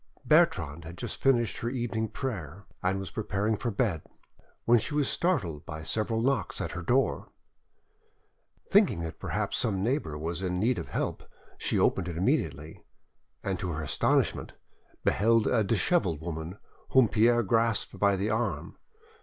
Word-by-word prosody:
Bertrande 90 - +3
had 85 +2 -9
just 120 -4 -5
finished 120 -4 +2
her 115 - -2
evening 120 -3 -2
prayer, 100 - -5 0.2
and 95 +1 +1
was 95 -1 -6
preparing 105 0 -1
for 120 - -2
bed, 100 -7 0 0.6
when 120 0 +6
she 110 +7 -4
was 145 -3 +2
startled 90 - 0
by 80 -1 -7
several 110 +5 -1
knocks 135 +1 0
at - - -3
her 90 - -5
door. 125 +10 +1 1.4
Thinking 195 - +4
that 80 -1 -6
perhaps - - -2
some 100 -6 0
neighbour 115 - -1
was 85 +4 -3
in 90 -1 -1
need 120 +5 +1
of - - -6
help, - - -2 0.4
she - - 0
opened 90 - +2
it 85 -2 -5
immediately, 80 -4 -1 0.6
and 95 -3 -2
to 90 - -3
her 80 +1 -4
astonishment - - +1 0.5
beheld 115 +1 +3
a 115 -3 +2
dishevelled 105 - +1
woman 80 +3 -5 0.4
whom 130 -3 +6
Pierre 120 +2 +3
grasped 115 +1 0
by 100 -1 +4
the 100 +3 -1
arm. 100 -9 -2
105 Hz, 155 wpm, -29 LUFS, 85-120 Hz, 1.4 s, when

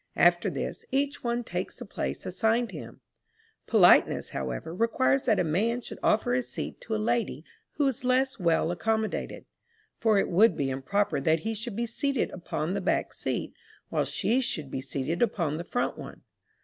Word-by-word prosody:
After - - +4
this, - - -4
each 285 +1 -1
one 240 0 -1
takes 180 -3 -4
the 245 - -7
place 200 - -4
assigned 225 +4 +1
him. 160 - -9 0.7
Politeness, - - +5
however, 65 - -4
requires 230 +6 +2
that 215 - +4
a - - +3
man 215 +10 0
should - - -8
offer 235 +3 +2
his 250 -1 -1
seat - - -5
to 220 - -3
a - - +1
lady 225 - -1 0.3
who 290 -2 +1
is 270 0 -2
less 255 0 +1
well 170 -1 +2
accommodated; 220 +4 -2 0.5
for 220 -2 +3
it 195 - +2
would 210 +6 +4
be 135 -2 0
improper 145 +4 0
that 160 +2 +2
he 225 +4 -2
should 225 0 -4
be 235 +2 -1
seated 275 +3 -1
upon 170 -1 -3
the 200 - -1
back - - 0
seat, - - -3 0.4
while - - +1
she 250 +4 +1
should 155 - -3
be 130 - -3
seated 135 +5 -3
upon 170 -10 +1
the 170 - -4
front 245 +7 -2
one. - - -10
220 Hz, 180 wpm, -28 LUFS, 170-240 Hz, 0.7 s, Politeness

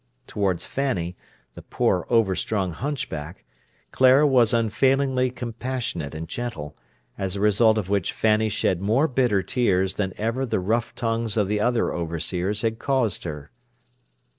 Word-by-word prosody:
Towards 95 -7 -1
Fanny, 95 -11 -2 0.4
the - - -10
poor, 90 - 0
overstrung 100 -3 +1
hunchback, 85 - -5 0.5
Clara 130 +3 +5
was 125 -5 +4
unfailingly 130 +3 +2
compassionate 120 - -4
and 80 +1 -5
gentle, 80 -12 -5 0.4
as 95 -1 -2
a - - -3
result 105 +2 +4
of 105 -4 -2
which 100 -3 0
Fanny 110 0 +2
shed 95 -3 0
more 115 +10 +2
bitter 120 -8 +1
tears 95 -6 +1
than 95 -2 -2
ever 115 +5 -1
the 110 -6 -1
rough 115 +6 -1
tongues 115 -1 -1
of 105 -3 +2
the 105 +1 0
other 120 +2 +1
overseers 90 +5 -2
had 115 0 -1
caused 130 -10 0
her. 75 -4 -7
110 Hz, 140 wpm, -24 LUFS, 95-120 Hz, 0.5 s, Clara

